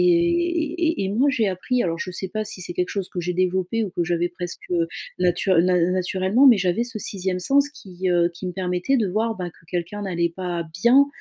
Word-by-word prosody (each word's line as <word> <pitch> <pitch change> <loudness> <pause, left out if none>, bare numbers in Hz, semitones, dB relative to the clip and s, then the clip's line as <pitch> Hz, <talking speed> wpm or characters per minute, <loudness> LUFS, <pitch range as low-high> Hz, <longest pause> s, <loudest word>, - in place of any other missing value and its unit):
et 345 - +2
et - - -1
moi 235 +8 +2
j'ai 230 -6 +1
appris 240 +7 -1
alors 165 -1 -1
je 185 - -4
sais 185 +1 -4
pas 215 +3 -3
si 205 -3 -5
c'est 175 - -5
quelque 180 0 0
chose 195 -3 -3
que 180 - -4
j'ai 175 +1 -2
développé 185 +4 +1
ou 200 - -5
que 175 - -1
j'avais 175 +1 0
presque, 175 0 -7
heu, 170 -2 +1 0.3
natur 180 0 +2
na 180 +1 +3
naturellement, 185 +7 +2
mais 240 -6 +7
j'avais 180 +4 +1
ce 230 -2 -4
6e 190 -2 -2
sens, 280 +8 +3
qui, 190 -10 -5
heu, 175 -1 +3
qui 180 +2 -7
me - - -4
permettait 180 +7 0
de 215 - +1
voir, 220 +4 0
bah, 180 -1 -4
que 165 - -24
quelqu'un 180 +4 -3
n'allait 170 -3 0
pas 175 -2 -3 0.2
bien, 265 +4 +6
185 Hz, 225 wpm, -23 LUFS, 180-235 Hz, 0.3 s, mais